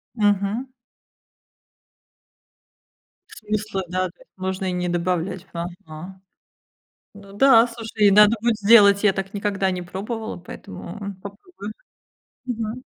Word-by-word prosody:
Мгм. 210 +4 0 2.6
Смысла, 210 -2 -3
да, 185 +1 0
то 170 - -19
есть - - -21
можно 190 0 -3
и 185 - -1
не 180 0 -1
добавлять. 180 +1 -2
Ага. 170 +1 -8 0.9
Ну 200 -1 -14
да, 235 +1 +6
слушай, 225 -3 0
и - - +6
надо 210 +2 +7
будет 235 -1 +1
сделать. 200 -1 +6
Я 205 -2 +5
так 195 +1 -4
никогда 200 -2 0
не 180 -1 -3
пробовала, 210 +6 -5
поэтому 200 +3 -8
попробую. 205 - -9 0.7
Мгм. 235 0 -4
200 Hz, 115 wpm, -23 LUFS, 185-215 Hz, 2.6 s, надо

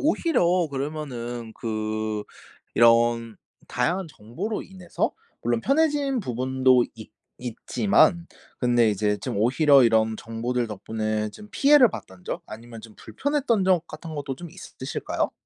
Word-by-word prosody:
오히려 185 - +2
그러면은 125 -5 -5
그 110 -1 -3 0.5
이런 115 -1 +4 0.3
다양한 170 +10 -1
정보로 160 - -5
인해서 185 -2 -3 0.3
물론 120 0 0
편해진 285 - +1
부분도 130 - +2
있 110 -1 -11 0.3
있지만 170 - +1 0.3
근데 120 -3 +3
이제 105 0 0
좀 100 - -4
오히려 135 +6 +5
이런 110 -1 +3
정보들 115 +2 -3
덕분에 110 +1 -3
좀 210 - -13
피해를 280 -3 +6
봤던 95 - -10
적 - - -4
아니면 115 +1 -10
좀 110 -1 -13
불편했던 275 -8 -1
적 180 -3 +2
같은 155 +1 -8
것도 140 -3 -4
좀 170 +3 -9
있으실까요? 145 -6 -4
125 Hz, 285 characters per minute, -25 LUFS, 115-175 Hz, 0.5 s, 피해를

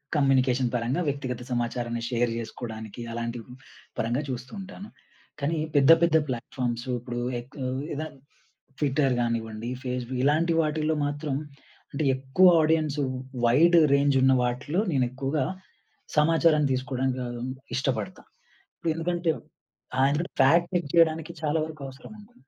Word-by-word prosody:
Communication 130 -3 +3
పరంగా 125 +8 0
వ్యక్తిగత 130 -3 -4
సమాచారాన్ని 120 -1 -2
షేర్ 120 -1 +1
జేసుకోవడానికి, 110 -1 -7
అలాంటి 115 0 -3 0.6
పరంగా 120 +5 0
చూస్తూ 125 0 -5
ఉంటాను. 195 +2 -9 0.5
కానీ 155 +4 -1 0.2
పెద్ద 140 +2 +6
పెద్ద 160 -1 +5
ప్లాట్‌ఫార్మ్స్ 120 0 -3
ఇప్పుడు 120 0 -5 0.2
ఎక్ 120 +2 -13 0.4
ఎదా 155 +2 -3 0.7
ట్విట్టర్ 140 -2 +2
కానివ్వండి 115 -1 -2
ఫేస్‌బుక్ 125 0 -3
ఇలాంటి 160 +4 +3
వాటిల్లో 155 0 0
మాత్రం 145 -1 -3 0.6
అంటే, 140 - -1
ఎక్కువ 135 +8 +4
ఆడియన్స్ 155 -2 +1 0.5
వైడ్ 165 +9 +5 0.2
రేంజ్ 140 0 +3
ఉన్న 130 0 +5
వాటిలో 125 +8 -1
నేనెక్కువగా 135 +1 0 0.7
సమాచారాన్ని 155 -1 +4
తీసుకోవడానికి 130 0 -1
ఆహ్, 120 0 -6 0.4
ఇష్టపడతాను. 130 -6 -3 0.7
ఎందుకంటే 170 0 -1 0.7
ఆ! - - +1
ఎందుకంటే 160 +5 -2
ఫాక్ట్ 170 +6 +5
చెక్ 175 -5 0
చేయడానికి 165 -1 +3
చాలా 155 +1 +1
వరకు 155 -2 -10
అవసరముంది. 210 - -13
135 Hz, 115 wpm, -26 LUFS, 120-155 Hz, 0.7 s, పెద్ద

